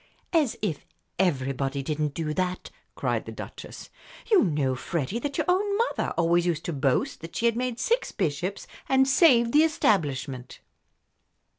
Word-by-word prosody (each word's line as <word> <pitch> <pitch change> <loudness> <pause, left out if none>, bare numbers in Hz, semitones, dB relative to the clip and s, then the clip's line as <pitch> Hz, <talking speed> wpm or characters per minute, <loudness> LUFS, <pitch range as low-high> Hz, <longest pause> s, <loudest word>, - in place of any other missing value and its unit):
"As 305 -8 +2
if 170 -9 -2 0.4
everybody 135 -5 0
didn't 150 0 -2
do 155 -2 -2
that!" 180 +2 -2 0.2
cried - - -1
the - - -5
Duchess. - - -9 0.4
"You 415 - +6
know, 145 -8 0
Freddie, 160 - -3
that 280 +2 -4
your 310 - 0
own 400 +3 +2
mother 470 +2 0
always 170 +1 +2
used 165 -2 -1
to 170 - -2
boast 135 -2 0
that 165 0 -9
she 235 - -1
had 230 -1 +3
made 250 -1 -2
six - - 0
bishops 175 +6 -2 0.2
and 265 0 +4
saved 255 -5 +5
the 300 - +7
Establishment." 145 - 0
180 Hz, 155 wpm, -26 LUFS, -, 0.4 s, the